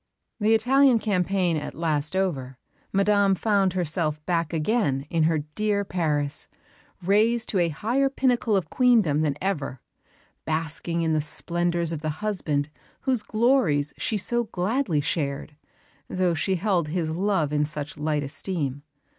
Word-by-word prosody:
The 220 +1 +4
Italian 260 +3 +4
campaign 185 -5 +1
at 150 - -5
last 155 0 -1
over, 135 -10 -1 0.3
Madame 200 0 +3
found 195 -1 +1
herself 155 -3 -1
back 170 -3 0
again 160 - 0
in 165 -2 +2
her 160 0 +2 0.2
dear 205 +1 0
Paris, 150 -6 -1 0.6
raised 220 +5 +2
to 195 - +1
a 170 -1 +2
higher 240 - 0
pinnacle 250 -5 +1
of 180 -5 -1
Queendom 220 - +3
than 145 -3 0
ever, 150 -9 -2 0.6
basking 165 +1 -2
in 160 -1 +1
the 155 - +2
splendours 170 +2 -1
of 160 -3 -4
the 155 -1 -3
husband 150 -8 -1 0.3
whose 260 -4 +1
glories 215 - +2
she 220 - -1
so 240 +4 0
gladly 190 - 0
shared, 145 0 -2 0.5
though 185 -2 +1
she 190 +4 0
held 180 -3 0
his 160 0 -2
love 170 -4 0
in 150 0 +2
such 150 0 -4
light 150 -1 -1
esteem. 145 -2 -3
175 Hz, 145 wpm, -25 LUFS, 155-210 Hz, 0.6 s, The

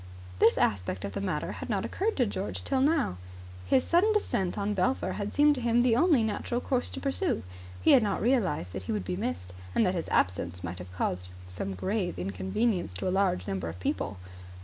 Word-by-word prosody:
This - - +5
aspect 90 -2 0
of 100 - -4
the - - -4
matter 180 -6 -2
had - - -7
not - - 0
occurred 435 +3 -1
to 250 - +4
George 200 -2 -4
till 270 -1 +1
now. 285 - +2 0.5
His 260 - +4
sudden 360 +6 +3
descent 195 - 0
on 205 0 0
Belpher 225 +7 0
had 205 0 -3
seemed 295 0 +5
to 260 - -4
him 235 0 +3
the 240 -2 +4
only 290 -3 +4
natural 220 +2 -1
course 250 0 -1
to - - -6
pursue. 290 +7 -1 0.4
He - - +6
had 260 - +7
not 205 -3 0
realized 190 - +1
that 95 - -4
he - - +2
would 105 -4 -2
be 90 -1 -2
missed, 90 +2 -4 0.2
and 225 - +4
that 185 - +2
his 170 -3 -3
absence 90 -1 0
might 90 0 -5
have 90 0 -9
caused 90 0 -2 0.5
grave 190 - -1
inconvenience 95 - -1
to 90 - -3
a - - +1
large 190 - +1
number 95 -4 -2
of 85 +2 -8
people. 95 +1 -2
190 Hz, 210 wpm, -29 LUFS, -, 0.5 s, had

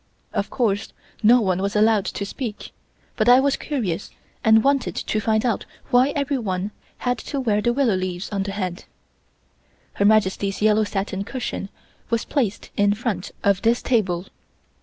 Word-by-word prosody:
Of 200 -2 -1
course 210 -5 -1 0.3
no 235 +3 +6
one 185 -3 0
was 200 +1 -2
allowed 215 -1 +4
to 200 - -3
speak, 220 0 -6 0.5
but 215 +2 +3
I 250 +1 +8
was 275 +1 +2
curious 220 - -3 0.3
and 220 0 +5
wanted 275 -1 +1
to 215 - -1
find 220 +1 +1
out 230 -5 0 0.3
why 250 +3 +5
everyone 220 -9 -1 0.3
had 245 0 -1
to 280 - -4
wear 215 -5 +1
the 240 - +2
willow 250 -3 +2
leaves 185 0 -3
on 200 -2 -1
the 195 +1 -3
head. 185 -2 -4 1.1
Her 200 - +1
Majesty's 200 -2 +2
yellow 215 0 +3
satin 195 -1 -3
cushion 220 -4 -4 0.4
was 230 0 0
placed 230 -8 -2
in 205 0 +3
front 210 -5 -3
of 200 -1 +3
this 235 +1 +2
table. 190 -7 +1
215 Hz, 160 wpm, -23 LUFS, 195-240 Hz, 1.1 s, I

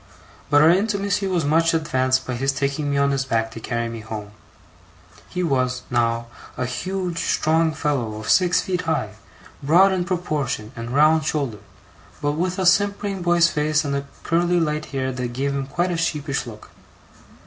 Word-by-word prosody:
But 145 0 +5
our 160 - +7
intimacy 200 +1 0
was 175 -5 0
much 165 +3 +3
advanced 130 -4 +1
by 130 - -3
his 135 +3 0
taking 140 +1 -2
me 140 - 0
on 140 0 +3
his 135 -1 0
back 115 -4 -1
to 115 - -8
carry 115 +1 -2
me 115 0 -6
home. 110 -2 -7 1.0
He 180 0 -2
was, 130 -5 0
now, 115 -1 +1 0.3
a 130 - -1
huge, 180 +6 -3
strong 160 +1 +2
fellow 140 -9 -2
of 110 0 -7
six 180 -1 +4
feet 180 -1 -2
high, 130 -10 -1 0.5
broad 175 +7 +5
in 185 -2 0
proportion, 150 - -2
and 115 0 -6
round 155 +4 +4
shouldered; 135 -10 -2 0.6
but 145 - 0
with 180 +4 -2
a 190 - 0
simpering 200 +1 +2
boy's 175 -1 +4
face 150 0 0
and 140 0 -1 0.2
curly 175 +1 +2
light 155 -2 -1
hair 130 -1 -3
that 125 -1 -4
gave 140 +3 -1
him 135 -1 -3
quite 175 +5 -1
a 170 - -1
sheepish 150 -5 -2
look. 110 -2 -11
150 Hz, 175 wpm, -22 LUFS, 130-175 Hz, 1.0 s, our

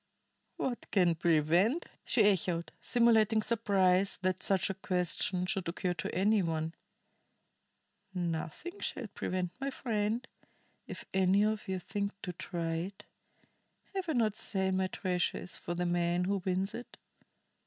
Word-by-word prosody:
"What 245 -2 -3
can 180 -4 +4
prevent?" 170 - +3 0.2
she - - +3
echoed, 180 -4 +1
simulating 225 -2 +4
surprise 195 -4 +3
that 185 0 0
such 195 0 +2
a - - -3
question 180 0 0
should 185 -1 -1
occur 180 +1 -1
to - - -4
any 205 +3 +4
one. 160 -1 -1 1.4
"Nothing 175 - -4
shall 250 - -3
prevent, 180 -2 -2
my 275 - 0
friend, 230 -1 -1 0.6
if - - -7
any 190 +1 +4
of 215 0 0
ye 190 0 -1
think 200 +2 -3
to 180 - -4
try 165 -1 -3
it. 190 +4 -6 0.9
Have 380 -3 -3
I - - +2
not 220 -5 +2
said 190 -3 0
my 190 0 +1
treasure 180 -2 -1
is 180 - -3
for 175 - -4
the 180 +1 -1
man 175 0 +1
who 200 +2 +1
wins 190 +2 0
it. 240 +2 -8
190 Hz, 145 wpm, -32 LUFS, 175-215 Hz, 1.4 s, can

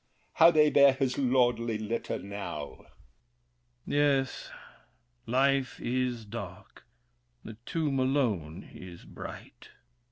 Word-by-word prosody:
how 165 - +7
they 155 -2 +5
bear 140 -1 +6
his 130 -1 -1
lordly 120 -3 +2
litter 110 +2 -3
now! 85 -7 -7 1.1
THE - - -7
KING. 145 - +2
Yes, 135 -2 +1 0.8
life 135 +2 +1
is 125 -2 -2
dark; 100 -4 -9 0.6
the 110 - -8
tomb 150 -5 -1
alone 110 - -1
is 90 -2 -11
bright. - - -10
125 Hz, 105 wpm, -29 LUFS, 105-135 Hz, 1.1 s, how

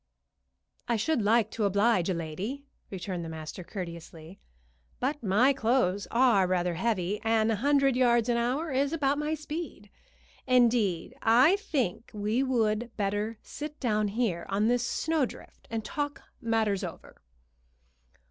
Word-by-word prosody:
"I 235 - +1
should 245 +5 0
like 220 +1 +3
to 220 - -2
oblige 200 -1 +2
a 185 - 0
lady," 185 - -5 0.2
returned 185 -2 -5
the 165 - -6
master, 160 +3 -7
courteously, 170 -2 -8 0.6
"but 285 +4 -1
my 230 +6 +3
clothes 225 -6 +1
are 230 -6 +4
rather 180 -1 0
heavy, 200 0 -1
and 225 0 +2
a 220 - 0
hundred 275 +2 +3
yards 240 -2 +3
an 240 - +2
hour 255 +7 -1
is 275 +3 +1
about 290 -2 +1
my 300 +1 -1
speed. 305 -8 -7 0.6
Indeed, 230 -8 +2
I 250 - +5
think 265 - -2
we 210 +4 0
would 235 -3 0
better 205 +2 -1
sit 300 0 -7
down 215 -4 +1
here 205 -4 -1
on 205 +3 +1
this 245 0 +2
snowdrift, 315 -5 -3
and 225 -1 -3
talk 290 -1 -4 0.2
matters 225 -4 0
over." - - -9
225 Hz, 140 wpm, -28 LUFS, 200-260 Hz, 0.6 s, I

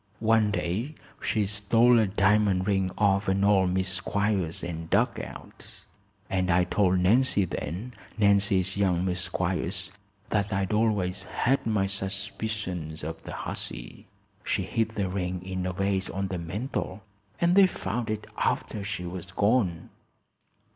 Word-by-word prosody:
One 110 -1 +3
day 105 - -2 0.3
she 105 -2 +1
stole 115 +4 +4
a 110 - +3
di'mond 100 -1 +3
ring 95 -2 +1
off'n 100 -1 +2
old 100 -2 +4
Miss 95 0 0
Squiers 100 -5 -1
and 80 -1 -6
dug - - +2
out, - - -9 0.4
and 95 -1 0
I 90 +1 +4
told 90 +1 +2
Nancy 100 +2 +3
then 90 - -5 0.2
Nancy's 100 -2 +3
young 95 -3 +1
Miss 90 -1 -1
Squiers 90 +1 -2 0.4
that 105 0 +1
I'd 95 0 0
always 100 -3 +1
had 135 -1 0
my 105 -3 +2
suspicions 95 -4 -4
of 80 +1 -5
the - - -8
hussy. - - -7 0.4
She - - 0
hid 115 -1 0
the 105 -4 -2
ring 90 -1 -3
in 95 -1 -3
a - - -1
vase 95 +1 0
on 95 0 -3
the 90 -2 -3
mantle 100 +3 -4 0.4
and 170 +1 +3
they 195 0 +7
found 115 - -3
it 110 0 -3
after 105 - -1
she 100 -3 -3
was 90 0 -6
gone." 100 -4 +1
95 Hz, 145 wpm, -27 LUFS, 90-105 Hz, 0.4 s, they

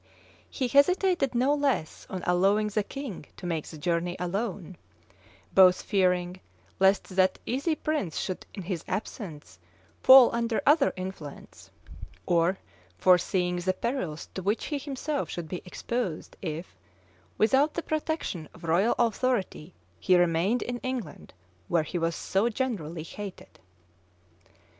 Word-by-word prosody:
He 260 - -2
hesitated 290 0 +3
no 260 +4 +3
less 280 - -1
on 185 -1 -5
allowing 195 +4 +3
the 210 +1 0
king 225 - -7
to - - -9
make 165 -3 -2
the 160 - -9
journey 175 +2 -1
alone; 185 -1 -3 0.8
both 185 -1 +6
fearing 180 -2 +1 0.4
lest 195 +1 +3
that 185 0 +2
easy 280 +6 0
prince 300 - -2
should 185 - -3
in 195 - -6
his 175 -2 -4
absence 180 - -6 0.4
fall 260 -2 +9
under 235 -1 0
other 290 0 +5
influence, 185 -6 -8 0.6
and 175 +2 +2 0.4
foreseeing 180 - +3
the 185 +1 0
perils 185 - -3
to 190 - -4
which 205 +5 -1
he 295 -2 -2
himself 285 +1 -3
should 175 -2 -5
be 180 - -4
exposed 190 -2 -4
if, 165 - -5 0.6
without 265 +8 +3
the 340 - -2
protection 310 - -3
of - - -16
royal 175 +7 +2
authority, 230 -8 -1 0.2
he 180 - +4
remained 175 +7 +2
in 245 0 -4
England 245 - -5 0.4
where 165 - +2
he 175 +3 -4
was 165 0 0
so 200 +5 0
generally 200 - -3
hated. 200 +3 -9
190 Hz, 135 wpm, -28 LUFS, 175-250 Hz, 0.8 s, fall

